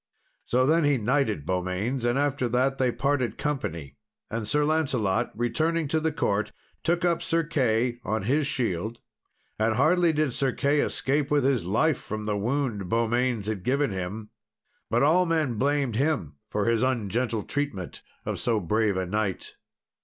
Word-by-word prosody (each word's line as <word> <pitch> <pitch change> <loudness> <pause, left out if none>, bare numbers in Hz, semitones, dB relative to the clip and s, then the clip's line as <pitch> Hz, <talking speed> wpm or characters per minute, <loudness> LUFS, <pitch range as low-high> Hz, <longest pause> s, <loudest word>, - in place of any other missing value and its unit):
So 130 +1 +2
then 160 +4 +3
he 145 -2 +3
knighted 115 - 0
Beaumains, 95 - -1
and, 120 +2 +2
after 140 -3 0
that, 130 +3 +1
they 130 -2 +2
parted 140 -2 0
company, 85 - -3 0.3
and 110 -1 -3
Sir 150 +6 +2
Lancelot, 130 -11 +1
returning 155 +7 0
to 160 - +2
the 160 0 0
court, 105 -9 0 0.3
took 175 +1 +1
up 170 -1 +2
Sir 165 0 +1
Key 125 -6 0
on 110 +1 -1
his 140 +6 +1
shield. 115 -4 -2 0.6
And 110 0 +2
hardly 165 +6 +4
did 150 -4 0
Sir 135 0 0
Key 145 +1 +1
escape 145 +1 0
with 145 -2 +2
his 130 -8 +1
life, 125 - +2
from 110 0 -5
the 105 -1 -1
wound 110 -3 -1
Beaumains 115 0 +1
had 105 -3 -3
given 140 +1 +1
him; 100 +4 -5 0.6
but 120 +4 +2
all 175 +5 +4
men 155 -9 0
blamed 140 -4 +1
him 130 - 0
for 105 -1 -1
his 115 -1 +2
ungentle 115 -2 0
treatment 145 -11 -4 0.2
of - - -3
so 115 -3 +1
brave 105 +2 +1
a 95 - -1
knight. 100 0 -2
125 Hz, 165 wpm, -26 LUFS, 110-145 Hz, 0.6 s, hardly